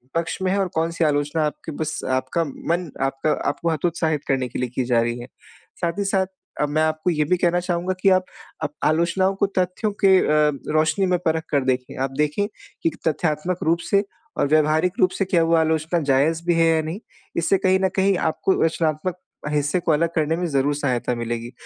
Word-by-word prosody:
पक्ष 165 0 -1
में 185 0 +1
है 200 - +1
और 195 - +1
कौन-सी 165 +1 0
आलोचना 150 +1 +1
आपके 150 +1 -5
बस 155 -1 -2 0.2
आपका 165 +6 -1
मन 170 +3 -3
आपका 135 +3 -1 0.2
आपको 170 - -2
हतोत्साहित 160 -1 -1
करने 130 -2 +1
के - - -5
लिए 125 -1 -1
की 130 - +1
जा 120 -1 +3
रही 120 +1 -2
है। 120 - -8 0.5
साथ 170 +2 -1
ही - - +1
साथ 195 -1 +2 0.4
अ, - - +3
मैं 150 +2 0
आपको 155 +2 0
ये 155 -2 +1
भी 180 - +3
कहना 175 0 +2
चाहूँगा 180 +1 -1
कि 195 - +5
आप 185 -1 +3 0.4
आप 145 -1 -2
आलोचनाओं 170 +4 +2
को 200 - +2
तथ्यों 185 +4 -1
के 190 -1 +7
अ, 150 0 +3 0.2
रोशनी 160 +5 +2
में 180 -1 +2
परख 160 -1 +1
कर 140 -2 +2
देखें। 125 -1 -1
आप 135 - -2
देखें 150 +7 +1 0.4
कि - - +2
एक - - -13
तथ्यात्मक 160 +2 0
रूप 165 +2 +2
से 200 0 +3 0.3
और - - +2
व्यावहारिक 155 +4 +3
रूप 185 - +5
से 195 - +2
क्या 175 -3 +2
वो 165 +1 +3
आलोचना 160 +1 +1
जायज़ 160 +5 +2
भी 175 - +4
है 165 0 +4
या 160 - +2
नहीं। 160 +5 -5 0.4
इससे 170 +4 +3
कहीं 190 0 +2
न - - +2
कहीं 195 -1 +3
आपको 165 +4 0
रचनात्मक 165 +1 0 0.3
हिस्से 150 +3 +1
को 165 - 0
अलग 165 +2 +2
करने 160 0 +1
में 180 - -1
ज़रूर 145 -1 +1
सहायता 125 -4 -1
मिलेगी। 120 0 -4
160 Hz, 210 wpm, -22 LUFS, 150-180 Hz, 0.5 s, के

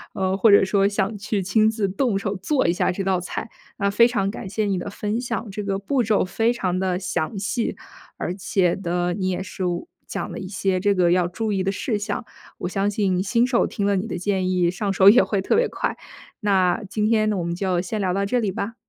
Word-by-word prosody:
呃， 190 0 0
或 210 +3 +4
者 200 -1 +7
说 195 +1 +2
想 200 +1 -1
去 200 0 -2
亲 215 +4 +3
自 220 -3 -1
动 225 +1 0
手 200 0 -2
做 260 - 0
一 170 - +3
下 180 - +1
这 195 +2 -3
道 190 -1 +1
菜。 185 +5 -5 0.3
那 200 0 +1
非 235 +3 +6
常 200 -5 -1
感 190 - -7
谢 215 +1 -1
你 195 -3 0
的 - - -5
分 210 +3 -3
享， 235 -3 -4
这 210 +2 -4
个 195 -1 -1
步 250 +7 0
骤 215 -4 +2
非 225 +6 +1
常 185 -7 -1
地 185 -1 0
详 180 0 -2
细， 225 +4 -2 0.4
而 175 - -3
且 185 -2 +1
呢 175 -1 -1
你 185 0 -1
也 185 0 -2
是 190 -1 -6 0.4
讲 - - -4
了 - - -6
一 190 - -6
些 190 -1 -1
这 200 +2 +2
个 175 -2 +3
要 180 -1 +3
注 220 +5 -3
意 190 -1 0
的 195 - 0
事 210 +1 -2
项。 205 +3 -3 0.3
我 - - -4
相 195 +2 0
信 195 -3 0
新 230 +5 +2
手 250 -1 +2
听 200 - -3
了 200 0 +2
你 190 +4 -2
的 180 - -4
建 185 0 0
议， 180 -2 +2
上 195 +2 -2
手 195 0 +7
也 245 +5 +7
会 200 -3 -1
特 195 - +1
别 480 +2 +3
快。 - - -2 0.5
那 195 +1 +2
今 210 +1 -1
天 215 -1 +2
我 185 -4 -2
们 170 0 -2
就 185 -1 0
先 210 +4 -4
聊 185 -2 0
到 200 +1 0
这 245 +5 +1
里 210 -4 0
吧。 200 +4 -4
195 Hz, 260 characters per minute, -23 LUFS, 185-215 Hz, 0.5 s, 者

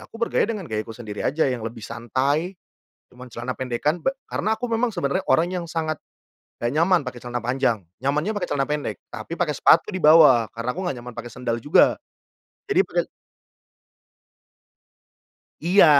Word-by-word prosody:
aku - - -12
bergaya 235 - +1
dengan 210 -4 -3
gayaku 110 +1 -3
sendiri 105 -4 -7
aja 155 +4 +2
yang 125 -2 -3
lebih 115 0 -8
santai, 135 - -1 0.5
cuma 125 +1 -12
celana 120 +3 -4
pendekkan 130 +6 -1
be 270 - +3 0.2
karena 220 +1 0
aku 245 - -2
memang 230 +1 +1
sebenarnya 140 -7 0
orangnya 170 +7 +3
yang 170 - -11
sangat 155 -2 -2 0.6
gak 120 +1 -1
nyaman 165 +1 +3
pakai 125 -1 -7
celana 120 0 -3
panjang, 120 -5 0 0.2
nyamannya 150 +9 0
pakai 180 -3 -2
celana 140 -1 +1
pendek, 150 -1 -2 0.2
tapi 170 - -6
pakai 170 -3 0
sepatu 165 - +5
di 185 - -3
bawah 150 -8 +7
karena 115 +2 -5
aku 180 - -6
gak 135 - -3
nyaman 125 0 -8
pakai 120 0 -6
sendal 120 -1 -2
juga 145 - +4 0.7
jadi 385 -2 +4
pade - - -1 2.5
Iya 180 +2 +6
140 Hz, 165 wpm, -23 LUFS, 120-175 Hz, 2.5 s, bawah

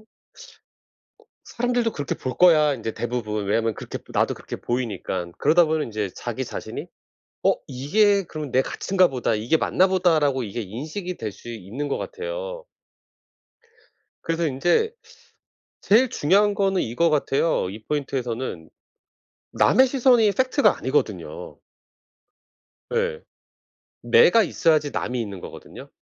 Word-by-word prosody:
어 215 - -22 1.4
'사람들도 245 -1 -1
그렇게 145 -2 -3
볼 130 - -5
거야.' 155 -5 +5
인제 115 -2 -5
대부분. 110 -4 -3
왜냐하면 115 +1 +1
그렇게 - - -7
나도 - - +1
그렇게 - - -8
보이니깐. 100 -7 -3
그러다 165 +4 +5
보면 155 -1 0
인제 105 -3 -3
자기 - - -4
자신이 - - -6 0.6
'어 - - +5
이게 200 +10 +2
그럼 155 -5 -7
내 130 - +4
가치인가 185 +5 +1
보다. 125 -4 -1
이게 115 +9 +1
맞나 185 +4 +2
보다.'라고 155 -8 +2
이게 115 +3 -5
인식이 155 - -6
될 110 -2 -4
수 120 - -12
있는 115 +6 -5
것 140 - -1
같아요. - - -6 1.6
그래서 165 0 -1
인제 175 - +1 0.9
제일 235 +5 +4
중요한 200 +6 +2
거는 195 -2 +1
이거 155 +9 +1
같아요, 145 - +1
이 110 +2 -9
포인트에서는. 130 - -3 0.8
남의 260 +1 +5
시선이 250 -4 +4
fact가 260 +7 +2
아니거든요. - - -3 1.4
예. 475 0 -1 0.8
내가 465 - +5
있어야지 155 -4 +1
남이 125 -1 -2
있는 100 -5 -5
거거든요. - - -11
150 Hz, 300 characters per minute, -23 LUFS, -, 1.6 s, 거야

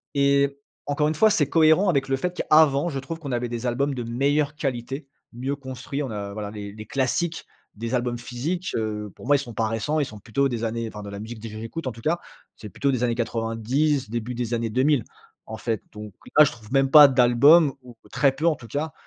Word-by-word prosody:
Et 140 0 +2 0.3
encore 150 +1 +1
une 155 - -1
fois, 220 +8 +5
c'est 150 -8 +2
cohérent 160 +5 +4
avec 140 -6 +1
le 135 - +1
fait 180 +5 -3
qu'avant, 155 -1 +4
je 140 - -4
trouve 165 +5 -6
qu'on 145 -4 -6
avait 120 0 -1
des 120 +1 -5
albums 140 +4 0
de 125 - -4
meilleure 140 +5 0
qualité, 135 0 -4 0.3
mieux 130 +4 -3
construits. 130 +1 -6
On 135 - -4
a 100 -1 -5
voilà 105 -1 -5
les 100 -1 -7
les 110 0 -9
classiques, 140 +8 -1 0.3
des 115 +4 -3
albums 120 -1 -1
physiques. 140 +10 -4
Heu, 105 -2 -3
pour - - -12
moi, 145 - +5
ils - - +2
sont 120 -4 -7
pas 110 0 0
récents. 115 +8 -1
Ils 145 - +1
sont 110 -4 -10
plutôt 135 +7 0
des 120 -2 -3
années 115 0 -2
enfin 105 -1 -9
de 100 - -7
la 100 0 -7
musique 110 +2 -8
de 115 - -6
j 105 - -10
j 110 - -7
j'écoute 135 +6 -6
en - - -1
tout 115 0 -12
cas. 165 +7 0 0.4
C'est 105 - -9
plutôt 140 +8 0
des 125 -2 -1
années 120 -1 +1
90, 120 +4 -1
début 120 +2 -4
des 120 -1 -3
années 115 -1 -1
2000. 130 +1 +2 0.4
En 110 - -6
fait, 110 -1 -2
donc, 105 -1 -9 0.2
là 150 - +10
je 150 - -1
trouve 115 -5 -14
même 135 -1 +3
pas 150 -1 +10
d'album 135 +4 +5
ou 125 -1 -13 0.2
très 135 +1 +3
peu, 145 +5 -4
en 165 - +3
tout 120 -4 -13
cas, 150 +5 -3
130 Hz, 240 wpm, -24 LUFS, 115-145 Hz, 0.4 s, là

